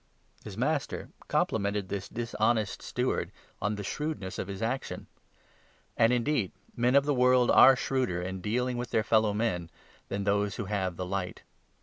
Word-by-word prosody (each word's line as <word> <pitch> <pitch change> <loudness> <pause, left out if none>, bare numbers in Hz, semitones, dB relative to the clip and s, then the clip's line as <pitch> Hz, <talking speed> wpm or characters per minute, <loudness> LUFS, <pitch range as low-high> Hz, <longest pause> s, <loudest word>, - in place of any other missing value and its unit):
His - - -8
8 - - -14
master - - -1 0.2
complimented 100 -2 0
this 100 -1 -4
dishonest 110 -2 0
steward - - -1 0.3
on 105 +2 0
the 100 - -5
shrewdness 145 -5 -4
of - - -3
his 100 +2 -5
action. 130 +4 -3 0.9
And 115 +1 +4
indeed 125 -4 +1 0.2
men 120 +2 +2
of 140 0 +5
the 145 - +2
world 125 -1 +4
are 135 +1 +8
shrewder 125 -9 -1
in 95 +1 -4
dealing 125 +5 -1
with 120 -1 -4
their 110 - +1
fellow 110 -2 +3
men 90 -7 -1 0.4
than 100 0 -3
those 100 0 +1
who 115 - -4
have 95 -3 -1
the 90 - -4
Light. 90 -1 -4
105 Hz, 165 wpm, -29 LUFS, 100-125 Hz, 0.9 s, are